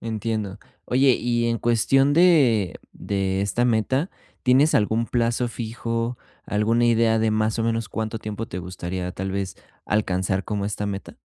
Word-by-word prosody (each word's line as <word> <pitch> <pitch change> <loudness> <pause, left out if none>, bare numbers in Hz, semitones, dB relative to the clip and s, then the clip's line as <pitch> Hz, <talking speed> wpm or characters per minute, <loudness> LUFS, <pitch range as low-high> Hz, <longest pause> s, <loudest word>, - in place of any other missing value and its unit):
Entiendo. 110 -2 -3 0.3
Oye, 130 +1 +4
y 120 -1 0
en 115 - 0
cuestión 135 +5 +3
de 140 - +4
de 95 -1 -2
esta 115 +4 0
meta, 130 - +1 0.3
¿tienes 135 +4 +4
algún 110 +2 +2
plazo 120 0 0
fijo? 115 +1 -3 0.3
¿Alguna 115 +3 +2
idea 115 -1 +3
de, 110 0 +2
más 110 +1 0
o 115 - +1
menos, 115 -2 -1
cuánto 110 0 -3
tiempo 105 +1 -5
te 90 - -5
gustaría 90 0 -5
tal 95 0 -4
vez 95 -1 -3 0.3
alcanzar 95 -2 0
como 105 -2 -2
esta 105 0 -3
meta? 100 -1 -6
110 Hz, 155 wpm, -23 LUFS, 100-120 Hz, 0.3 s, Oye